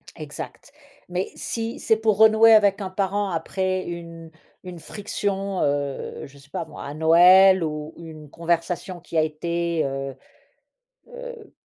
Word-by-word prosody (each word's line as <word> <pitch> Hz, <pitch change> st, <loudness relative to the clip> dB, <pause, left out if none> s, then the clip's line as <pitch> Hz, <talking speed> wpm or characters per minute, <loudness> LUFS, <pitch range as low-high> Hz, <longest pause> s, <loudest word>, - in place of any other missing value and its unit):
Exact. 150 Hz, -, -9 dB, 0.4 s
Mais 180 Hz, +2 st, -2 dB
si 230 Hz, 0 st, -4 dB
c'est 220 Hz, -, +2 dB
pour 220 Hz, -2 st, +1 dB
renouer 220 Hz, +1 st, +7 dB
avec 205 Hz, -2 st, +4 dB
un 190 Hz, -, -4 dB
parent 195 Hz, +1 st, -1 dB
après 185 Hz, +2 st, -2 dB
une 170 Hz, -1 st, -8 dB, 0.3 s
une 180 Hz, -2 st, -9 dB
friction, 200 Hz, 0 st, -3 dB
heu, 140 Hz, -1 st, -2 dB
je 140 Hz, 0 st, -15 dB
sais 140 Hz, +1 st, -19 dB
pas 170 Hz, +1 st, -4 dB
moi, 155 Hz, -1 st, -10 dB
à 140 Hz, -, -6 dB
Noël 180 Hz, +4 st, +6 dB
ou 150 Hz, 0 st, -5 dB
une 155 Hz, -3 st, -11 dB
conversation 170 Hz, +2 st, -2 dB
qui 170 Hz, -1 st, -6 dB
a -, -, +5 dB
été, 170 Hz, +1 st, -1 dB
heu 135 Hz, 0 st, -4 dB, 0.9 s
heu -, -, -20 dB
heu, -, -, -10 dB
175 Hz, 150 wpm, -23 LUFS, 160-200 Hz, 0.9 s, renouer